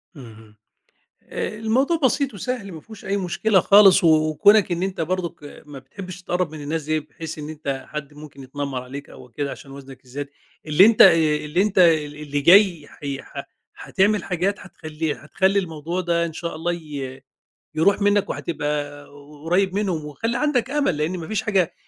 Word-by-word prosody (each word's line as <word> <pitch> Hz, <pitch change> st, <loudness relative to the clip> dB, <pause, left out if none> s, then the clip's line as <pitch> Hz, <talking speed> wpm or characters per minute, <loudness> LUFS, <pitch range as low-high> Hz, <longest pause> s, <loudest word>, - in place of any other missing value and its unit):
اهم، 110 Hz, -5 st, -14 dB, 0.7 s
آآ، 215 Hz, -, -4 dB
الموضوع 255 Hz, +9 st, +1 dB
بسيط 275 Hz, 0 st, +1 dB
وسهل، 205 Hz, 0 st, -4 dB
ما 160 Hz, -3 st, -9 dB
فيهوش 220 Hz, -3 st, -13 dB
أي 200 Hz, +1 st, -1 dB
مشكلة 190 Hz, +2 st, +1 dB
خالص، 195 Hz, 0 st, +6 dB
و -, -, +5 dB, 0.2 s
وكونَك 200 Hz, +6 st, +4 dB
إن 175 Hz, +1 st, -1 dB
أنت 190 Hz, -3 st, -3 dB
برضك 170 Hz, -2 st, -3 dB
آآ، 145 Hz, -, -12 dB
ما 145 Hz, -2 st, -10 dB
بتحبش 180 Hz, +6 st, -10 dB
تتقرّب 180 Hz, -2 st, -2 dB
من 155 Hz, -1 st, -8 dB
الناس 155 Hz, +2 st, -3 dB
دي، 155 Hz, +1 st, 0 dB
بحيث 155 Hz, +2 st, -9 dB
إن 150 Hz, 0 st, -7 dB
أنت 140 Hz, -4 st, -5 dB
حد 150 Hz, -1 st, -7 dB
ممكن 145 Hz, -2 st, -12 dB
يتنمّر 135 Hz, -1 st, -4 dB
عليك 140 Hz, +3 st, -9 dB
أو 125 Hz, -, -14 dB
كده، 140 Hz, +4 st, -4 dB
عشان 135 Hz, -, -11 dB
وزنك 135 Hz, -2 st, -12 dB
الزيادة، 140 Hz, +3 st, -6 dB, 0.4 s
اللي 155 Hz, +6 st, +6 dB
أنت 225 Hz, -1 st, +5 dB
آآ، 190 Hz, -, +10 dB, 0.3 s
اللي 160 Hz, +5 st, 0 dB
أنت 205 Hz, -1 st, -1 dB
آآ، 165 Hz, -4 st, +5 dB
ال 145 Hz, -, -10 dB
اللي 145 Hz, -1 st, -3 dB
جاي 175 Hz, -2 st, +5 dB
حي 140 Hz, -2 st, -6 dB
ح -, -, -8 dB, 0.3 s
حاتعمل 205 Hz, -1 st, 0 dB
حاجات 190 Hz, +3 st, -1 dB
حتخلّي، 160 Hz, -4 st, -5 dB
حتخلّي 190 Hz, +6 st, 0 dB
الموضوع 170 Hz, 0 st, -4 dB
ده 170 Hz, -1 st, 0 dB
إن 165 Hz, -, -6 dB
شاء 170 Hz, 0 st, -5 dB
الله 170 Hz, +2 st, -2 dB
ي 140 Hz, -5 st, -7 dB, 0.5 s
يرُوح 195 Hz, +7 st, +2 dB
منّك 205 Hz, 0 st, +2 dB
وهتبقى 145 Hz, -2 st, -4 dB, 0.4 s
قُرّيب 185 Hz, +3 st, +1 dB
منهم، 185 Hz, -7 st, -1 dB
وخلّي 225 Hz, +11 st, -3 dB
عندك 280 Hz, -5 st, 0 dB
أمل، 280 Hz, -, 0 dB
لإن 165 Hz, +5 st, -2 dB
ما 160 Hz, -, -7 dB
فيش 215 Hz, -, -1 dB
حاجة 195 Hz, -6 st, 0 dB
165 Hz, 185 wpm, -22 LUFS, 145-195 Hz, 0.7 s, آآ